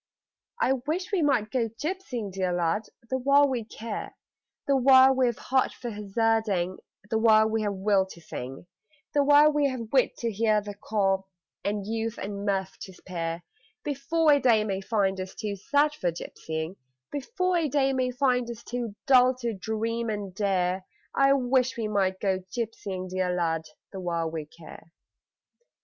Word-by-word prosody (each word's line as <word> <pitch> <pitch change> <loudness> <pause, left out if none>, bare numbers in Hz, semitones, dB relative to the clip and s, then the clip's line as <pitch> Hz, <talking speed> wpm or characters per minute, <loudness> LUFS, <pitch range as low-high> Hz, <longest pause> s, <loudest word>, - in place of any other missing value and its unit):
I 265 - +3
wish 365 +6 -2
we 390 -4 +1
might 245 -8 +2
go 235 -3 0
gypsying, 255 - -4
dear 185 -1 -1
lad, 175 +4 0 0.2
the 260 - +1
while 280 +2 +5
we 250 -4 -2
care 220 0 -6 0.5
The 280 - +3
while 265 0 +7
we've 250 -3 +1
heart 260 0 +1
for 240 -2 -6
hazarding, 210 -3 0 0.3
The 220 - +2
while 220 -1 +5
we've 220 -2 0
will 195 0 +2
to 180 - -12
sing, 135 -3 -7 0.5
The 285 - +4
while 290 +2 +6
we've 260 -6 -1
wit 260 -2 +3
to 230 -1 -2
hear 215 0 +2
the 205 0 -7
call 195 -2 0 0.4
And 205 -1 -2
youth 225 +1 -2
and 200 0 -5
mirth 195 -2 -2
to 190 - -9
spare, 170 -2 -5 0.4
Before 295 +2 +2
a 285 - +4
day 230 -5 +4
may 195 -2 -2
find 195 -3 0
us 185 0 -7
too 210 -2 -3
sad 285 +8 +2
for 180 - -1
gypsying, 160 +1 -6 0.3
Before 365 - -1
a 320 -3 0
day 270 -1 +2
may 255 -1 +1
find 250 -2 +1
us 235 -1 -7
too 235 -4 -4
dull 255 -1 +6
to 240 -2 -3
dream 225 +3 -2
and 205 -3 -4
dare 185 -2 0 0.3
I 275 0 +4
wish 255 -1 +1
we 225 -2 -1
might 190 -3 0
go 190 -2 0
gypsying, 200 -5 -4
dear 185 -1 0
lad, 165 -2 0 0.3
the 195 - -7
while 170 -3 -2
we 155 -2 -5
care. 165 +1 -14
220 Hz, 165 wpm, -27 LUFS, 190-260 Hz, 0.5 s, while